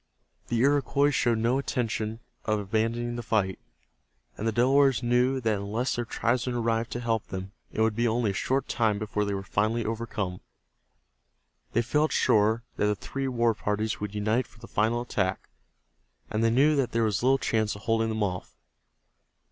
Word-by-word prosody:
The 120 - -1
Iroquois 140 +1 +3
showed 120 -4 +2
no 115 +4 +2
intention 115 -4 -2 0.2
of 110 0 +1
abandoning 115 +4 -1
the - - -3
fight, 105 -5 0 0.8
and 110 - -3
the - - +2
Delawares 130 +1 +3
knew 125 +2 +2
that 110 -3 +1
unless 110 +6 -1
their 120 - -2
tribesmen 120 +2 0
arrived 115 -1 0
to 120 - -3
help 115 -3 -1
them 95 0 -6 0.2
it - - -2
would 110 -1 +2
be 120 +1 +2
only 115 -2 +1
a - - -5
short 130 +7 0
time 110 -4 +1
before 105 0 -1
they 100 -1 -1
were 95 - -4
finally 110 +4 0
overcome. 110 -5 -3 1.3
They 120 - +2
felt 150 +6 +1
sure 110 +2 +3
that 105 - +2
the 105 - +1
three 135 +6 -4
war 120 -2 +2
parties 105 +2 -2
would 105 0 -5
unite 110 +4 +1
for 110 - -22
the - - -12
final 115 +3 +1
attack, 95 -6 -2 0.8
and 110 +1 0
they 115 - +4
knew 140 +6 +4
that 135 -3 0
there 115 0 +2
was 110 -2 0
little 130 +2 +4
chance 110 -5 0
of 100 - -11
holding 115 0 +1
them 110 -1 -1
off. 90 -3 -4
115 Hz, 180 wpm, -27 LUFS, 105-120 Hz, 1.3 s, they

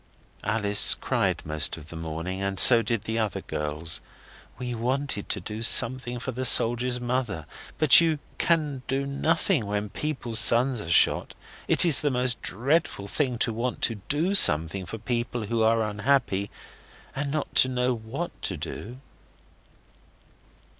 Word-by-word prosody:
Alice 105 -1 +1
cried - - -2
most 75 +1 -1
of 80 0 -13
the - - -10
morning, 80 +4 -6
and 100 -1 -2
so 120 -2 +10
did 115 -2 -3
the 110 +1 -3
other 110 -3 -3
girls. 75 +2 -4 0.6
We 125 -1 -5
wanted 125 -1 -3
to 105 - -1
do 105 +4 -8
something 125 +1 +3
for 130 +2 -6
the 130 +1 -5
soldier's 120 +1 +1
mother, 120 - -3 0.3
but 155 0 +7
you 165 -2 0 0.2
can 150 -6 0
do 135 +1 -2
nothing 150 - -1
when 105 0 -3
people's 125 -6 -1
sons 120 +1 +4
are 85 - -8
shot. 85 - +2 0.3
It - - +5
is 165 -5 +6
the 150 - 0
most 125 -2 0
dreadful 125 - -2
thing 125 +2 -2
to 115 - -4
want 120 +3 -4
to 110 -4 -1
do 165 +7 0
something 80 - +4
for 115 - -7
people 120 0 -4
who 115 +2 -2
are 115 0 +2
unhappy, 105 -2 -1 0.7
and 140 +1 -3
not 150 +1 -4
to 130 - +6
know 125 0 -1
what 120 +9 -6
to 95 - -4
do. 110 - -8
120 Hz, 155 wpm, -25 LUFS, 100-130 Hz, 0.7 s, so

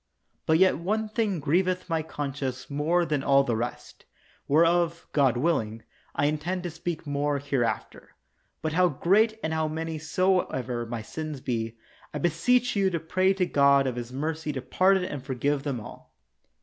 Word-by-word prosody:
But 160 - +5
yet 185 -2 +4
one 215 +5 -1
thing 210 -5 0
grieveth 180 +6 +1
my 165 -2 0
conscience 140 -4 -5
more 165 +5 +1
than 150 -4 -1
all 140 0 +4
the 120 -4 -1
rest, 120 +2 -5 0.4
whereof, 170 +2 +3
God 135 -5 +3
willing, 115 -7 0 0.3
I 145 - +1
intend 170 +5 -1
to 175 - -4
speak 165 0 -5
more 145 0 0
hereafter. 135 -4 -3 0.5
But 155 -1 -1
how 180 +1 +4
great 210 - +2
and 160 - -1
how 160 -1 0
many 160 0 -4
soever 150 -8 0
my 115 -1 -4
sins 155 +3 -6
be, 115 -3 -3 0.4
I - - 0
beseech 235 +10 +2
you 195 -1 +3
to 170 -3 -2
pray 185 +4 +1
to 185 -2 +1
God 140 -3 +4
of 130 -2 -1
His 120 0 -6
mercy 155 +3 -3
to 130 - -4
pardon 185 +6 +3
and 145 -6 -5
forgive 140 +1 -1
them 140 -4 -3
all. 105 - -12
155 Hz, 170 wpm, -27 LUFS, 135-175 Hz, 0.5 s, But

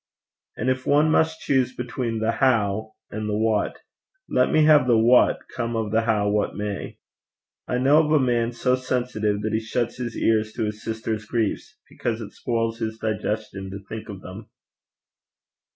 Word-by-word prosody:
And 120 - -2
if 130 0 -3
one 150 +2 +4
must 160 0 +2
choose 130 -2 +1
between 120 -1 -3
the 110 +1 +1
how 110 -4 +1 0.2
and 105 0 -4
the 105 - 0
what, 110 -1 0 0.5
let - - +2
me 155 - +4
have 150 -4 +6
the 120 -2 +5
what, 120 +3 +4
come 120 -1 -2
of 110 -2 -2
the 110 +1 +3
how 110 -3 +1
what 105 0 0
may. 105 -1 -4 0.7
I 125 - 0
know 140 +5 +5
of 150 - -2
a 155 - +5
man 120 -3 +1
so 125 +1 0
sensitive, 120 -5 -1
that 110 0 -1
he 110 - +2
shuts 115 +2 -2
his 120 -2 -4
ears 110 -1 +1
to - - -2
his 105 0 -4
sister's 110 -1 -3
griefs, 120 - -2
because 115 -2 -3
it 110 - -7
spoils 115 -1 -2
his 110 -1 -3
digestion 110 -3 -3
to 95 - -6
think 110 0 -7
of 100 -2 -8
them. 100 +4 -10
115 Hz, 180 wpm, -24 LUFS, 110-125 Hz, 0.7 s, have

